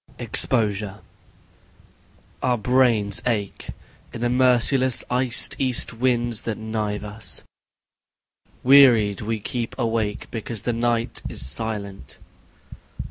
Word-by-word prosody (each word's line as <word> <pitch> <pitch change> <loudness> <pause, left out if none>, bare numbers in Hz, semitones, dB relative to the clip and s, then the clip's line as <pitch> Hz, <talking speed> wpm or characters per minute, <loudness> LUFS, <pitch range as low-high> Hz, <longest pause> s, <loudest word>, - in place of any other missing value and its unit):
Exposure 105 -4 +2 1.4
I - - -2
Our 125 -1 +1
brains 115 -4 +1
ache, 105 -5 -3 0.4
in 115 - -9
the 120 - 0
merciless 130 +1 +2
iced 125 -1 +4
east 130 -4 +2
winds 120 -1 -1
that 115 -2 -5
knife 110 -2 -4
us... 105 +1 -4 1.2
Wearied 120 -7 +5
we 110 +1 -3
keep 115 +2 -5
awake 110 -3 -2
because 115 -1 -5
the 120 - -2
night 115 0 -1
is - - -3
silent 100 - -5
115 Hz, 105 wpm, -22 LUFS, 105-125 Hz, 1.4 s, Wearied